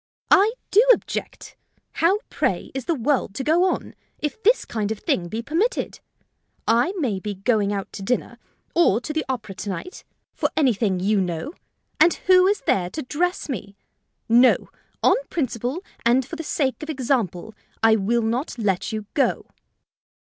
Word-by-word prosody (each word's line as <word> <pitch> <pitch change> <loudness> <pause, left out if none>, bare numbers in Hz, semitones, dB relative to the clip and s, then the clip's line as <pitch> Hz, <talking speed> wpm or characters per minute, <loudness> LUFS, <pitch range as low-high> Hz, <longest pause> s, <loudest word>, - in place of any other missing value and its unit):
"I 415 +4 +6 0.2
do 430 - +6
object. - - -2 0.4
How, 350 +5 +2
pray, - - -1
is 265 -2 -4
the 335 - +1
world 255 -5 0
to 265 - -3
go 330 +6 +3
on, - - -5 0.2
if 300 +8 -4
this 465 +4 +3
kind 215 -2 -2
of 220 - -2
thing 175 -3 -1
be 220 +6 -4
permitted! 360 - -1 0.7
I 240 +9 +3
may 240 - -1
be 205 +1 -5
going 205 0 +1
out 200 -1 -4
to - - -7
dinner, 245 +6 -2 0.3
or 330 - +4
to 300 +5 -5
the 315 - 0
opera 235 -6 -3
to 195 +2 -6
night, 195 - -6 0.3
for - - 0
anything 220 -10 +2
you 200 +2 +2
know, 180 - -3 0.5
and 345 - +5
who 370 0 +6
is 410 +1 +1
there 180 -2 +1
to 310 - -5
dress 350 +7 -1
me? 200 - -6 0.5
No; 240 +2 +4 0.3
on - - +5
principle, 260 - -2 0.2
and 245 +2 +3
for 330 - -7
the 325 - -5
sake 280 -4 -1
of 305 - -7
example, 235 - -1 0.3
I 225 0 +6
will 225 +3 +1
not 240 +5 -2
let 205 -2 -1
you 215 -1 -4
go." 280 - +1
245 Hz, 170 wpm, -23 LUFS, 210-315 Hz, 0.7 s, I